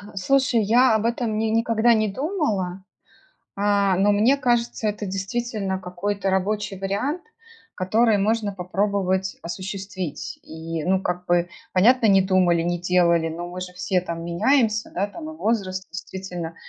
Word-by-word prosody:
Слушай, 260 +3 +2
я 235 +2 +4
об 220 - 0
этом 230 -2 -1
ни 220 - 0
никогда 230 +1 +3
не 215 -1 +2
думала, 205 - -2 0.7
а, 200 -1 +2
но 200 +2 +4
мне 225 +7 +4
кажется, 240 -4 0
это 210 0 -3
действительно 195 0 -3
какой-то 195 +2 -3
рабочий 195 +1 -1
вариант, 230 - -2 0.5
который 215 +4 +2
можно 210 +1 0
попробовать 190 0 -1
осуществить. 190 -1 -5
И, 160 0 -6
ну, 190 +2 +1
как 180 0 -3
бы, 175 0 +2 0.2
понятно, 225 +5 +4
не 195 -1 +6
думали, 185 -3 +3
не 175 +1 -1
делали, 170 -2 +2
но 170 +2 -5
мы 180 +1 -7
же 180 0 -6
все 180 0 0
там 170 -1 -5
меняемся, 215 +5 +1
да, 200 +3 0
там 310 +9 -8
и 315 - -10
возраст, 190 -4 -1
действительно, 180 -1 -6
195 Hz, 145 wpm, -23 LUFS, 180-220 Hz, 0.7 s, не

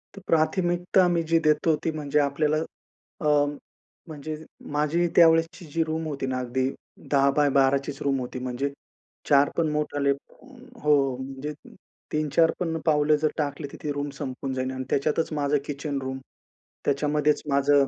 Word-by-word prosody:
तर 200 - -10
प्राथमिकता 175 +3 +2
मी 175 -1 +2
जी 165 - +6
देतो 155 +1 +3
ती 160 - 0
म्हणजे 150 -1 0
आपल्याला 150 +2 +1 0.6
अ, 150 - +2 0.8
म्हणजे 155 0 -6 0.4
माझी 150 +4 +1
त्यावेळेसची 165 +1 +4
जी 165 - +2
रूम 160 +1 -2
होती 140 -3 -3
ना, 130 -1 -1
अगदी 130 +1 -1 0.4
10x12 140 -1 +4
चीच 145 0 -6
रूम 135 -1 +1
होती. 125 0 -5
म्हणजे 125 +2 -2 0.6
4 140 0 +5
पण 165 - +2
मोठाले 145 -2 0
हो. 150 - -2
म्हणजे 135 +3 -6 0.6
3-4 155 +2 +3
पण 165 -2 -1
पावले 150 -1 +4
जर 155 +1 +1
टाकले, 145 -1 -2
तर - - -8
ती 150 - -1
रूम 145 0 -3
संपून 130 +1 -4
जाईल 130 0 -2
आणि 130 0 -4
त्याच्यातच 155 +4 +1
माझं 145 -1 +1
किचन 145 -1 -3
रूम, 130 0 -4 0.7
त्याच्यामध्येच 150 +1 +1
माझं 140 0 +4
150 Hz, 150 wpm, -26 LUFS, 140-160 Hz, 0.8 s, जी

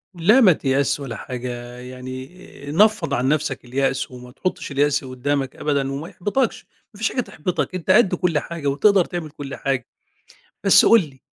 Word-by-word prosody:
لا 210 +10 +5
ما 190 -7 +7
تيأسش 140 0 0
ولا 130 -5 -6
حاجة، 120 -1 -6
يعني 130 +1 -8 0.4
نفّض 210 -4 +3
عن 130 0 +1
نفسك 150 -4 -1
اليأس 135 +2 -1
وما 125 0 -11
تحطش 185 0 -4
اليأس 145 0 +1
قُدامك 135 +1 -2
أبدًا 140 -2 -1
وما 145 +5 -5
يحبطكش، 225 +7 -1 0.3
ما - - -14
فيش 220 +2 0
حاجة 250 - 0
تحبطك، 180 -1 -3
أنت 185 0 0
قد 195 -3 +5
كل 170 -4 +1
حاجة 165 -3 -5
وتقدر 180 +7 +4
تعمل 170 -3 -5
كُل 140 -2 -7
حاجة. 135 -4 -2 0.8
بس - - +6
قُل 230 -3 +7
لي، 130 -1 -21
140 Hz, 170 wpm, -22 LUFS, 130-180 Hz, 0.8 s, ما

